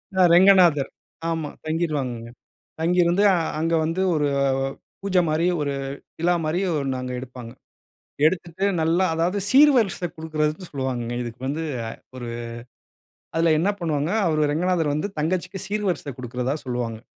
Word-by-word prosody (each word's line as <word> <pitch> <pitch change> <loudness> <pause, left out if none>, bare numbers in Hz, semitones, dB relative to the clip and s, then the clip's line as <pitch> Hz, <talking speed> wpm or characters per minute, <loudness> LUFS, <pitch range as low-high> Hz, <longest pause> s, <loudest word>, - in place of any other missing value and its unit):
அ 190 - +3
ரெங்கநாதர் 175 -6 +6 0.4
ஆமா 160 -3 -2 0.2
தங்கிருவாங்கங்க. 145 -8 -2 0.5
தங்கியிருந்து 175 +3 +3 0.4
அங்க 165 +1 0
வந்து 165 +4 -1
ஒரு 150 -1 +1 0.7
பூஜ 195 -1 0
மாரி 155 +2 +1 0.2
ஒரு 145 -1 -1 0.5
விழா 175 +2 +2
மாரி 155 +4 0
ஒன்னு 135 -3 -1
அங்க 125 0 -4
எடுப்பாங்க. 125 -2 -9 0.7
எடுத்துட்டு 175 +3 0 0.2
நல்லா 170 +4 +2
அதாவது 175 +5 0
சீர்வரிசை 255 -10 +5
குடுக்கிறதுன்னு 155 +2 -2
சொல்வாங்கங்க 125 -4 -3
இதுக்கு 120 +1 -8
வந்து 160 +4 -2 0.5
ஒரு 120 -2 -6 1.1
அதுல 165 0 +3
என்ன 190 - +2
பண்ணுவாங்க 155 -2 -1 0.2
அவரு 155 -2 +2
ரெங்கநாதர் 165 -2 +1
வந்து 155 +7 -2
தங்கச்சிக்கு 185 +4 -1
சீர்வரிசை 200 -8 -2
குடுக்கிறதா 125 +2 -2
சொல்வாங்க. 120 -3 -3
160 Hz, 120 wpm, -23 LUFS, 140-180 Hz, 1.1 s, ரெங்கநாதர்